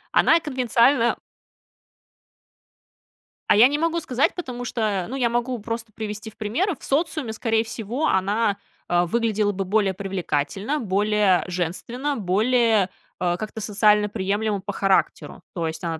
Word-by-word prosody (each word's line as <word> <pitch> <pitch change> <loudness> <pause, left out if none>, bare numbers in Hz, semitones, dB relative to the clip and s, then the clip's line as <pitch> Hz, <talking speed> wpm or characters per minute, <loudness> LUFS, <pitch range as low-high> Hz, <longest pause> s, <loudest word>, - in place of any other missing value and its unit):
она 330 - +5
конвенциально 250 -3 +2 2.3
А - - +6
я 230 +4 +8
не 290 - -1
могу 330 +2 0
сказать, 260 -3 0
потому 250 -8 -5
что, 210 -6 -1
ну 260 - -4
я 245 -3 +1
могу 240 +1 -1
просто 230 +1 -5
привести 215 0 -6
в - - -27
примеры, 315 - -1
в - - -18
социуме, 295 -4 -1
скорее 225 0 0
всего, 230 +6 -3
она, 200 +2 +1 0.3
э, 175 0 +3
выглядела 215 +1 0
бы 195 -1 -3
более 200 0 +1
привлекательно, 195 - -2
более 205 -2 +2
женственно, 190 - -3
более, 220 +2 +2 0.3
э, 175 -1 0
как-то 215 0 -6
социально 210 0 +3
приемлемо 205 0 -1
по 205 0 -5
характеру. 195 -1 0
То 170 -5 -2
есть, 160 - -6
она 165 -2 -3
215 Hz, 145 wpm, -23 LUFS, 195-245 Hz, 2.3 s, я